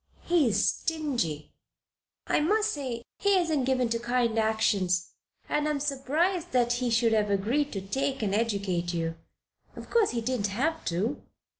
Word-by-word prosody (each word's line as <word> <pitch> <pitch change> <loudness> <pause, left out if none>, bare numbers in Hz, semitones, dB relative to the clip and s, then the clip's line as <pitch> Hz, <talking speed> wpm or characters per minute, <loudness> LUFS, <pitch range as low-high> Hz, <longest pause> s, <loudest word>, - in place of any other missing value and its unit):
He 335 -6 +3
is 205 -2 +2
stingy 250 - -2 0.4
" - - -66 0.3
"I - - +2
must 420 +7 +2
say 275 - -3
it. 235 +1 -10
He 400 -1 +3
isn't 315 -7 +1
given 255 -2 +2
to 230 0 0
kind 235 -1 +1
actions, 205 -5 +1 0.4
and 295 0 0
I - - +1
am 300 -1 0
surprised 305 +6 -1
that 240 -1 +3
he 245 0 -1
should 230 0 +3
have 210 -1 +2
agreed 235 +9 +1
to 195 - -3
take 270 +6 -2
and 200 -2 0
educate 200 -6 -1
you. 165 -1 -1 0.6
Of - - -10
course, 455 -4 +4
he 235 - -2
didn't 230 -3 -1
have 290 +11 -1
to." 200 +11 -1
240 Hz, 175 wpm, -28 LUFS, 205-295 Hz, 0.6 s, course